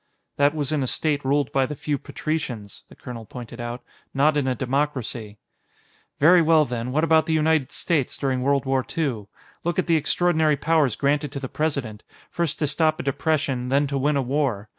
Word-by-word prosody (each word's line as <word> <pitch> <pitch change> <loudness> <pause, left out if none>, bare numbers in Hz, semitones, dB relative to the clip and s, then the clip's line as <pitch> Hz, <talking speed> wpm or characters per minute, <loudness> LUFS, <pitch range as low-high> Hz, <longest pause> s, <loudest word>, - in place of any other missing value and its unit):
"That 145 +2 +3
was 145 -2 -2
in 150 -2 0
a 130 - -1
state 145 +2 0
ruled 140 0 +1
by 135 -1 +2
the 150 - -5
few 145 0 -2
patricians," 125 -10 -4
the - - -15
colonel 120 -3 -8
pointed 120 +1 -9
out, 120 +1 -5 0.3
"not 145 +3 +3
in 145 -3 +1
a 130 - +1
democracy." 125 -5 -2 0.8
"Very 170 +4 +6
well, 160 -1 +4
then; 120 0 -4
what 155 +4 +1
about 160 -1 +4
the 160 - +1
United 155 -3 +2
States, 155 -7 -1
during 130 -2 -1
World 140 +1 +1
War 135 -1 +1
II? 125 -11 -1 0.4
Look 170 0 -1
at 185 - +1
the 165 -2 +3
extraordinary 155 0 +2
powers 150 -4 +2
granted 145 0 0
to 140 - -4
the 135 - -5
President 140 -9 -2 0.3
first 170 -4 -1
to 150 - 0
stop 155 +2 +1
a - - -3
depression, 140 -2 -1
then 140 +2 +3
to 140 0 -2
win 145 +2 +1
a 135 - +1
war. 125 -6 -1
140 Hz, 200 wpm, -24 LUFS, 130-155 Hz, 0.8 s, Very